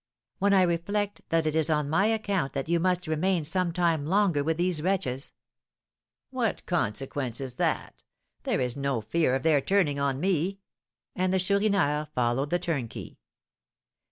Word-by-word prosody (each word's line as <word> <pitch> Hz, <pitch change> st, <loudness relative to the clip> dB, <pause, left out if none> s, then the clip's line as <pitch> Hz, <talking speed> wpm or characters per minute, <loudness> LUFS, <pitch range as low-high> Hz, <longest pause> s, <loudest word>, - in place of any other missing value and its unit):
"When 200 Hz, +1 st, +3 dB
I 190 Hz, -2 st, +5 dB
reflect 200 Hz, +4 st, -1 dB
that 165 Hz, -1 st, +2 dB
it 155 Hz, 0 st, 0 dB
is 160 Hz, 0 st, +2 dB
on 150 Hz, -2 st, +1 dB
my 165 Hz, +8 st, +2 dB
account 200 Hz, -9 st, -1 dB
that 135 Hz, +1 st, -3 dB
you 170 Hz, +1 st, +2 dB
must 180 Hz, 0 st, +1 dB
remain 165 Hz, +2 st, 0 dB
some 175 Hz, +3 st, 0 dB
time 165 Hz, -3 st, +1 dB
longer 185 Hz, -5 st, +2 dB
with 160 Hz, +1 st, 0 dB
these 175 Hz, -3 st, 0 dB
wretches 160 Hz, -8 st, -1 dB, 0.5 s
" -, -, -66 dB
"What 245 Hz, -4 st, -2 dB
consequence 130 Hz, -, -1 dB
is 130 Hz, -2 st, -4 dB
that? -, -, -2 dB, 0.4 s
There -, -, -1 dB
is 125 Hz, -1 st, -1 dB
no 140 Hz, -4 st, -1 dB
fear 130 Hz, +4 st, +1 dB
of 135 Hz, -, -2 dB
their 155 Hz, -3 st, +4 dB
turning 160 Hz, -5 st, +1 dB
on 140 Hz, -1 st, 0 dB
me;" 185 Hz, +2 st, 0 dB, 0.6 s
and 185 Hz, 0 st, 0 dB
the 190 Hz, -, +2 dB
Chourineur 190 Hz, -6 st, +1 dB
followed 125 Hz, +3 st, 0 dB
the 175 Hz, -, +2 dB
turnkey. 150 Hz, -10 st, -4 dB
165 Hz, 165 wpm, -27 LUFS, 140-185 Hz, 0.6 s, I